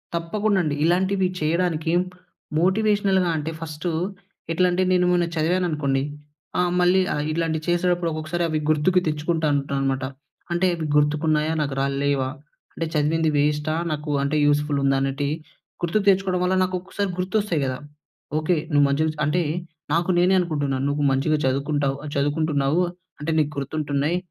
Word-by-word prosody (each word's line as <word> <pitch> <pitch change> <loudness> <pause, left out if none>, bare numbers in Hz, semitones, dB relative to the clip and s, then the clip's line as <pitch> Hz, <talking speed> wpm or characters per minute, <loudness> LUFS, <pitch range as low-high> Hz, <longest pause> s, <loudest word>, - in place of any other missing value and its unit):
తప్పకుండ 200 +5 0
అండి. 150 -2 -1
ఇలాంటివి 190 +2 +2
చేయడానికి 165 0 0 0.7
మోటివేషనల్‌గా 195 0 +2
అంటే, 155 +2 -3
ఫస్టు 160 +2 -4 0.6
ఎట్లా 180 +2 +3
అంటే, 180 +1 +1
నేను 180 0 +3
మొన్న 175 -1 +3
చదివాను 175 +3 +1
అనుకోండి. 140 -3 0 0.6
ఆహ్, 180 -1 +2
మళ్ళీ 180 +2 +4
ఆహ్, 150 - -1
ఇట్లాం‌టివి 160 -1 -1
చేసేటప్పుడు 175 0 +1
ఒక్కొక్కసారి 155 +2 -2
అవి 155 -1 -1
గుర్తుకు 155 +4 +3
తెచ్చుకుంటుంటాన్నమాట. 145 -4 0 0.5
అంటే, 175 +2 +2
అవి 165 -2 -4
గుర్తుకున్నాయా 150 +1 +2
నాకు 140 -2 -2
రాల్లేవా, 140 -1 0 0.4
అంటే, 165 - -3
చదివింది 155 +2 +2
వేస్టా, 150 +1 +1 0.2
నాకు 150 0 -4
అంటే, 145 +2 0
యూస్‌ఫుల్ 145 0 +1
ఉందా, 135 0 +3
అనేటి 135 +1 -1 0.5
గుర్తుకు 195 +4 +1
తెచ్చుకోవడం 190 -2 +2
వల్ల, 185 +1 +2
నాకు 185 0 -1
ఒక్కొ‌సారి 195 +1 -3
గుర్తొస్తాయి 185 -4 0
గదా! 130 -1 -2 0.6
ఓకే, 160 +2 +1 0.2
నువ్వు 145 0 +5
మంచిక 150 +3 +1 0.2
అంటే, 160 +5 +1 0.5
నాకు 170 +2 +1
నేనే 180 +2 +4
అనుకుంటున్నాను. 145 -6 -1
నువ్వు 145 +1 -1
మంచిగా 145 +3 +1
చదువుకుంటావు 140 +1 0
ఆహ్, 150 - -6
చదువుకుంటున్నావు 145 +2 +1 0.4
అంటే, 155 +2 -1
నీకు 150 -1 +1
గుర్తుంటున్నాయి, 145 +3 -1
155 Hz, 140 wpm, -23 LUFS, 145-180 Hz, 0.7 s, నువ్వు